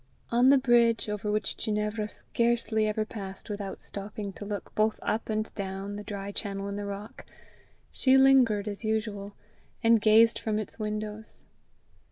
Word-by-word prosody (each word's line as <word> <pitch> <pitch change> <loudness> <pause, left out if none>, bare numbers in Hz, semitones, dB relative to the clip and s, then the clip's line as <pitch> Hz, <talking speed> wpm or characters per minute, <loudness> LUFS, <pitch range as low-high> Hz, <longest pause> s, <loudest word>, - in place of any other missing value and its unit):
On 245 +2 +5
the 280 - +7
bridge, 235 -4 +3
over 210 0 -2
which 210 -1 0
Ginevra 210 0 -1
scarcely 235 -2 0
ever 215 0 -1
passed 195 -1 -7
without 200 -2 -5
stopping 200 0 -6
to 205 - -8
look 205 -2 -5
both 215 0 +1
up 220 +1 -1
and 215 0 -2
down 195 0 -5
the 205 - -6
dry 200 -1 -5
channel 200 -1 -4
in 200 - -4
the 205 0 -4
rock, 200 +1 -7 0.7
she 265 0 +4
lingered 255 -6 +5
as 205 +2 -5
usual, 215 -2 -2 0.5
and 230 -1 +5
gazed 225 +2 +5
from 215 -1 -1
its 215 +1 -4
windows. 215 0 -5
215 Hz, 160 wpm, -28 LUFS, 205-225 Hz, 0.7 s, the